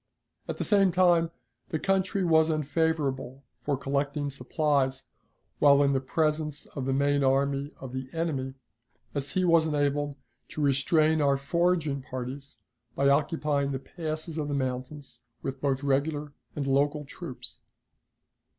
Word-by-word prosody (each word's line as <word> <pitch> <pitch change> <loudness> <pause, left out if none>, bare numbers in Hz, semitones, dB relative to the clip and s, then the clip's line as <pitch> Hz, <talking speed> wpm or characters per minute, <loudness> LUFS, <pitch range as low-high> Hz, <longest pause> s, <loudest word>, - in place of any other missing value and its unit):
At - - -4
the - - -1
same 195 -3 +4
time 175 -2 +4 0.4
the 160 - -1
country 195 +2 +1
was 160 -1 +4
unfavorable 145 -4 -1 0.2
for 145 -2 -1
collecting 140 +1 -1
supplies 135 0 0 0.6
while 145 -1 +6
in 140 0 +3
the 135 - +2
presence 150 +1 -1
of 135 -3 -6
the 135 - 0
main 140 +1 +2
army 140 +1 +1
of 130 -2 -8
the 130 0 -5
enemy, 140 -6 -2 0.6
as 140 -1 -3
he 185 -1 +2
was 165 -2 +4
enabled 145 -1 0 0.3
to 155 - -5
restrain 155 +3 +3
our 140 -1 +3
foraging 155 0 +1
parties 130 +2 -6 0.4
by 140 0 +3
occupying 145 -1 +1
the - - -1
passes 155 +3 -5
of 150 - -2
the 145 - -1
mountains 130 -1 -4 0.2
with 135 0 -4
both 135 -1 0
regular 145 +1 0 0.2
and 145 - -2
local 145 +2 +1
troops. 145 -2 -8
145 Hz, 140 wpm, -28 LUFS, 135-155 Hz, 0.6 s, while